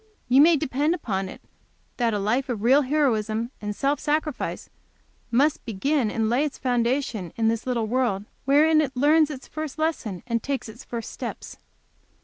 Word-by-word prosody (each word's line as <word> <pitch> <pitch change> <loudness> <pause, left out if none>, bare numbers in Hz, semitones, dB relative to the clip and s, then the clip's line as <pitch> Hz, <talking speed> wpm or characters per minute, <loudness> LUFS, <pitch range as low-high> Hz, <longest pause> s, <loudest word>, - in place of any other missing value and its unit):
You 260 +3 +6
may 325 +1 +6
depend 295 +3 0
upon 195 - -3
it - - -11 0.5
that 235 -2 +1
a 210 - 0
life 235 +7 0
of 220 -4 -3
real 265 +5 +5
heroism 235 -5 0
and 210 0 -4
self 280 +5 0
sacrifice 305 -2 -2 0.6
must 280 +6 +2
begin 245 +3 0
and 225 0 0
lay 245 +6 +2
its 295 -2 -3
foundation 240 - -1
in 225 -1 +2
this 230 +2 -2
little 240 -3 0
world, 215 -4 0 0.2
wherein 310 +3 +5
it 270 -4 -3
learns 300 +3 +4
its 275 -3 -8
first 310 -2 -6
lesson 305 - -2
and 230 -2 -1
takes 275 -3 -3
its 225 +3 -11
first 235 -2 -6
steps." - - -7
255 Hz, 170 wpm, -25 LUFS, 225-295 Hz, 0.6 s, You